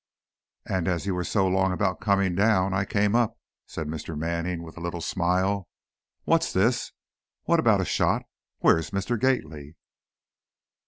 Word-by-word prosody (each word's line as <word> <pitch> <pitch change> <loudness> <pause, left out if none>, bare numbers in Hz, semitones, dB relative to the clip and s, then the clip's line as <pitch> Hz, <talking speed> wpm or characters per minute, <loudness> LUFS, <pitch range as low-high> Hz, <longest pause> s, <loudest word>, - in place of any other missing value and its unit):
"And 95 -2 -1
as 90 0 -1
you 100 - 0
were 90 0 -2
so 95 +1 +1
long 95 0 +2
about 95 0 -1
coming 100 -3 +2
down, 95 -1 +2
I 95 +1 0
came 100 +1 +1
up," 120 -3 +1 0.3
said 80 - -5
Mr. 80 0 -5
Manning, 85 +2 -2
with 80 - -11
a - - -9
little 85 0 -4
smile. 95 +3 0 0.6
"What's 165 0 +2
this, 115 +6 +1 0.5
what - - +2
about - - +4
a - - -1
shot? - - +1 0.4
Where's 80 -1 +3
Mr. 100 +4 -2
Gately?" 80 - -1
95 Hz, 155 wpm, -26 LUFS, 85-100 Hz, 0.6 s, about